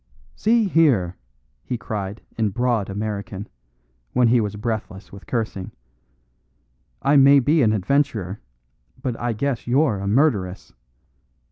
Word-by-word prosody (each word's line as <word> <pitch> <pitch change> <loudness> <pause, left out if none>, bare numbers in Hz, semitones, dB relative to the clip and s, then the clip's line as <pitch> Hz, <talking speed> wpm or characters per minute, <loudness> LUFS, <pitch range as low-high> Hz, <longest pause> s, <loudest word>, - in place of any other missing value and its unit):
"See 225 0 +2
here!" 130 - +3 0.5
he 125 - -3
cried 105 -2 -5
in 110 -2 +1
broad 120 -2 0
American, 105 0 -4 0.7
when 125 -2 +4
he 120 0 +4
was 105 -1 -3
breathless 105 -3 -5
with 100 - -13
cursing, 110 -6 -3 1.3
"I 140 - +3
may 140 +1 +7
be 150 +5 +3
an 110 -4 +4
adventurer, 110 -3 0 0.6
but 125 -2 -3
I 120 -1 -1
guess 125 +2 -2
you're 130 -4 +2
a 100 - -4
murderess. 100 - 0
115 Hz, 125 wpm, -22 LUFS, 100-135 Hz, 1.3 s, may